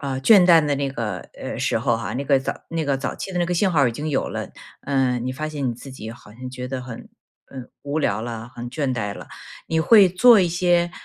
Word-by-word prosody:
呃， 135 -2 -3
倦 200 +8 +7
怠 165 -3 +6
的 145 -1 0
那 140 0 -2
个， 115 -5 -4 0.2
呃， - - -6
时 - - 0
候 120 - +1
哈， 105 -6 -5
那 135 +3 -3
个 140 -1 +3
早 130 - -3 0.2
那 165 -1 -2
个 140 -1 0
早 140 - -3
期 190 - -7
的 180 - -2
那 175 - +1
个 180 - -1
信 190 +2 +2
号 145 -6 +3
已 120 - 0
经 150 +7 -5
有 140 - -1
了， - - -5 0.3
嗯， 130 -3 0
你 130 - -2
发 155 +4 -4
现 145 -4 -3
你 - - -1
自 135 +3 -11
己 110 -4 -8
好 115 -2 -14
像 125 +3 -8
觉 125 0 -6
得 130 0 -5
很， 125 -2 -9 0.4
嗯， 130 -2 -8
无 145 +2 -2
聊 105 -6 0
了， 115 0 -6
很 120 0 -6
倦 135 0 -2
怠 105 -5 -3
了。 - - -11 0.4
你 160 - 0
会 200 +3 +6
做 220 +4 +6
一 180 - +2
些， 175 0 +1
135 Hz, 275 characters per minute, -22 LUFS, 125-165 Hz, 0.4 s, 倦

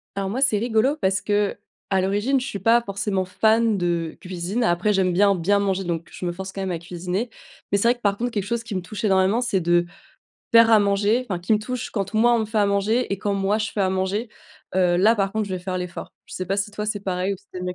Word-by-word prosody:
Alors 195 -1 -2
moi, 245 +7 -3
c'est 255 -7 +3
rigolo 235 +5 +2
parce 190 -10 0
qu'à 205 -1 0 0.4
l'origine, 205 +8 +1
je 250 - -5
suis 210 -7 -5
pas 230 +4 +4
forcément 200 -2 -2
fan 220 +3 +2
de 170 -2 -1
cuisine. 185 +5 -3
Après, 195 +1 +2
j'aime 190 -2 +2
bien, 200 +3 +4
bien 190 +3 +1
manger 195 -1 0
donc 170 -1 -3
je - - -7
me 175 - 0
force 190 +2 -7
quand 195 - -6
même 190 - -2
à 170 - -2
cuisiner. 180 +6 -4 0.4
Mais 200 - +3
c'est 230 - +2
vrai 240 - +4
que, 240 - -25
par 200 -2 +1
contre, 245 +3 -1
quelque 210 -5 -2
chose 235 +2 -2
qui 225 -3 -6
me 185 - -1
touche 205 +4 -7
énormément 195 +2 +3
c'est 225 -6 0
de 175 0 +2 0.7
faire 230 0 +7
à 220 - +7
manger, 205 +4 +1
enfin, 180 -4 -2
qui 180 +5 0
me 215 - +4
touche, 250 +3 -5
quand 200 -1 -3
moi, 235 +2 +4
on - - +2
me - - 0
fait 215 0 -2
à 205 - +4
manger 200 +4 +1
et 195 - -2
quand 200 +1 -1
moi 195 +2 +1
je 215 0 -2
fais 210 - -2
à 190 -1 +2
manger. 190 +5 -1 0.5
Heu, 180 -2 +3
là, 215 +6 +4
par 195 -1 0
contre, 220 -2 -2
je 190 - -3
vais - - -3
faire 185 +1 -4
l'effort. 180 -1 -6
Je - - -10
sais 185 - -4
pas 195 - -1
si 200 +1 -1
toi 210 0 -5
c'est 210 -1 -2
pareil 185 0 -1
ou - - -10
si 200 +2 -26
tu 185 - -7
aimes 180 - -5
bien 180 0 -3
200 Hz, 275 wpm, -23 LUFS, 185-220 Hz, 0.7 s, faire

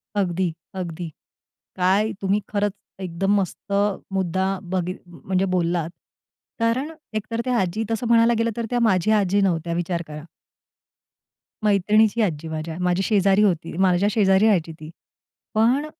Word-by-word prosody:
अगदी, 180 -3 0 0.2
अगदी. 175 -2 -5 0.7
काय 190 +4 +2
तुम्ही 195 +1 +1
खरंच 205 0 0 0.3
एकदम 185 +2 -1
मस्त 195 +1 -4 0.4
मुद्दा 190 0 0
बघ 185 -1 -2 0.2
म्हणजे 185 +2 -2
बोललात. 170 -2 0 0.7
कारण 240 +7 0 0.2
एकतर 215 +2 -2
त्या 250 -1 +1
आजी 190 +4 -1
तसं 225 +2 -1
म्हणायला 230 0 +5
गेलं 230 +1 +1
तर 235 - -1
त्या 245 - 0
माझ्या 215 -2 +3
आजी 200 +1 +2
नव्हत्या 170 -3 0
विचार 175 0 -2
करा. 150 0 -8 1.4
मैत्रिणीची 210 +2 +3
आजी 165 -6 -1
माझ्या, 160 +1 -5
माझी 180 +1 +1
शेजारी 200 0 +3
होती. 170 -6 0
माझ्या 190 +1 +3
शेजारी 195 -1 +4
राहायची 180 -7 +2
ती. 155 0 -9 0.6
पण 240 +7 +3
190 Hz, 135 wpm, -23 LUFS, 175-215 Hz, 1.4 s, म्हणायला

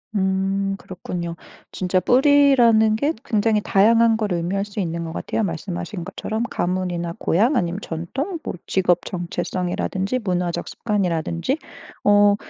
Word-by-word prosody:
음 195 0 0
그렇군요. 180 -4 -6 0.4
진짜 185 0 0
뿌리라는 245 - +5
게 285 +8 0
굉장히 215 -1 +2
다양한 225 +4 +4
걸 215 -3 -2
의미할 175 +4 -1
수 205 0 -7
있는 170 -2 -2
것 165 - -5
같아요. 220 - -2
말씀하신 175 0 -4
것처럼 220 +3 -3
가문이나 175 -1 -2
고향 230 - +2
아니면 175 +1 -1
전통 265 - -4
뭐 - - -4
직업 180 -2 +2
정체성이라든지 180 +5 -2
문화적 180 -2 -1
습관이라든지. 185 - -1 0.5
어 205 0 +6
195 Hz, 320 characters per minute, -22 LUFS, 175-220 Hz, 0.5 s, 어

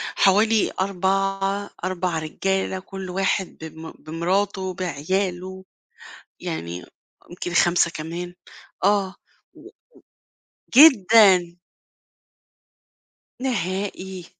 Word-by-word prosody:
حوالي 215 +3 +3
4 195 +1 0
4 180 -3 -1
رجالة 190 +4 -2
كل 190 -1 -8
واحد 190 0 -1
بم 160 0 -9
بمراته 185 +3 -2
بعياله. 185 +2 -3 0.7
يعني 85 +2 -5 0.4
يمكن 175 0 -6
5 175 0 +3
كمان 170 +3 -6 0.5
آه 195 -1 +2 0.4
و - - -17
و - - -13 1.1
جدًا. 205 - +7 1.8
نهائي. 190 -5 -3
185 Hz, 75 wpm, -23 LUFS, 175-195 Hz, 1.8 s, جدًا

